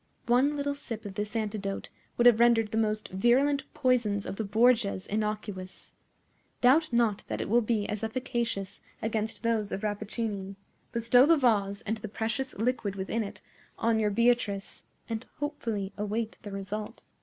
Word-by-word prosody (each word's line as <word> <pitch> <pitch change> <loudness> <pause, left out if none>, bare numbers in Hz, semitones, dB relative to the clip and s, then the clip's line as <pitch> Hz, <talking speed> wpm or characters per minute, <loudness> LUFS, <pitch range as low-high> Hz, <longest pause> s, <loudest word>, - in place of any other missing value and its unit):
One 265 +5 +3
little 285 0 -1
sip 230 -6 -6
of 200 - -6
this 210 +3 -4
antidote 210 -3 -3 0.3
would 240 - +3
have 240 -2 +7
rendered 230 -3 +4
the 220 - -1
most 215 -1 -1
virulent 260 +8 +2
poisons 235 -7 +1
of - - -4
the 220 - -1
Borgias 215 -2 +3
innocuous. 210 -3 -4 0.7
Doubt 285 +5 +4
not 235 -4 +2
that - - -3
it - - -2
will 235 +4 +4
be 215 -2 0
as 210 0 -4
efficacious 230 -4 -3 0.2
against 220 0 -2
those 225 -3 0
of 195 - -4
Rappaccini. 205 -1 -3 0.4
Bestow 245 +3 +5
the 330 0 +6
vase, 205 -7 +2
and 220 +2 -2
the 220 - -6
precious 225 +5 -3
liquid 220 -3 -1
within 200 +4 -1
it, 200 -2 -9 0.3
on 225 0 +2
your 210 -1 +2
Beatrice, 220 -3 +1 0.2
and 225 +1 -4
hopefully 230 -9 -3
await 215 +2 -2
the 205 - -7
result." 195 +2 -5
220 Hz, 160 wpm, -29 LUFS, 205-240 Hz, 0.7 s, have